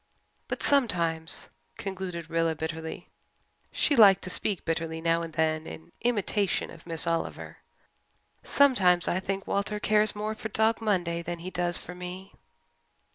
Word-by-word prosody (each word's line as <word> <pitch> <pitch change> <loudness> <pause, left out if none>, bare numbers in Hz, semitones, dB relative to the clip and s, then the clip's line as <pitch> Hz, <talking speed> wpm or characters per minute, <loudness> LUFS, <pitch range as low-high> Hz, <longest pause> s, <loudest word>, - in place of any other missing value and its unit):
But - - -4
sometimes," 170 - +1 0.3
concluded 185 -4 -5
Rilla 165 -1 0
bitterly 160 +1 -5 0.6
she 290 - +2
liked 200 -5 +7
to 185 - -3
speak 200 0 -1
bitterly 165 0 -2
now 165 0 +1
and 165 -1 -5
then 155 0 0
in 80 0 -10
imitation 205 -4 0
of 165 0 -14
Miss 165 -1 +2
Oliver 165 0 -3 0.9
"sometimes 190 -11 +4
I 175 - +1
think 195 +1 -3
Walter 210 +1 -1
cares 210 0 +2
more 210 +1 -2
for 220 0 -6
Dog 220 +2 +2
Monday 175 -6 0
than 175 +1 -4
he 180 +2 -7
does 175 -1 +1
for 180 - -8
me." 180 +2 -8
180 Hz, 145 wpm, -28 LUFS, 165-205 Hz, 0.9 s, liked